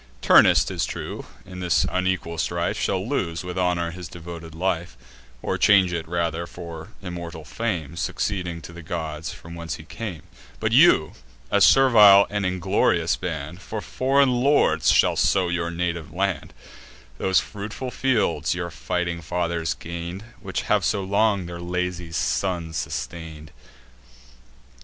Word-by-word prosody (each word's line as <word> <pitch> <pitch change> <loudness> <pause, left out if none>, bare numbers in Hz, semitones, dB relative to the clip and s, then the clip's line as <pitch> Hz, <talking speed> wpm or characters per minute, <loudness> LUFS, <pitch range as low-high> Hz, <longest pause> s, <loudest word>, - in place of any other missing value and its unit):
Turnus, - - +6
'tis - - -2
true, - - -6 0.2
in 90 -1 -9
this 90 -2 +2
unequal 95 -3 -1
strife, - - -1
Shall - - -1
lose, 85 +1 -2
with 90 0 -6
honour, 90 -2 0
his 90 0 -8
devoted 85 -1 -9
life, 85 -5 -2 0.5
Or - - -1
change 95 -4 +5
it 85 -1 -3
rather 85 0 -2
for 85 -2 -8 0.2
immortal 85 -3 -7
fame, 85 - -3
Succeeding 90 -2 -3
to 85 - -10
the 85 - -9
gods, 80 -2 -4
from 85 - -11
whence 85 -1 -5
he 80 - -11
came: 90 -1 -7 0.4
But - - 0
you, - - +6 0.4
a 100 - +3
servile 105 -5 +7
and 100 -2 0
inglorious 90 -2 +1
band, 85 0 -5
For 110 +1 -5
foreign 135 +4 +2
lords 135 +4 +3
shall - - +4
sow 95 -2 +2
your 85 -1 -1
native 85 -2 -3
land, 95 -2 -2 0.6
Those 95 -1 +3
fruitful 110 +5 -6
fields 85 - +1
your 85 -1 -4
fighting 85 +1 -2
fathers 85 0 -2
gain'd, 85 +3 -6 0.2
Which 95 -1 -3
have 105 -2 +2
so 100 +2 0
long 100 0 +1
their 85 0 -7
lazy 90 -1 -3
sons 85 -1 -1
sustain'd." 80 +1 -5
85 Hz, 145 wpm, -24 LUFS, 85-95 Hz, 0.6 s, servile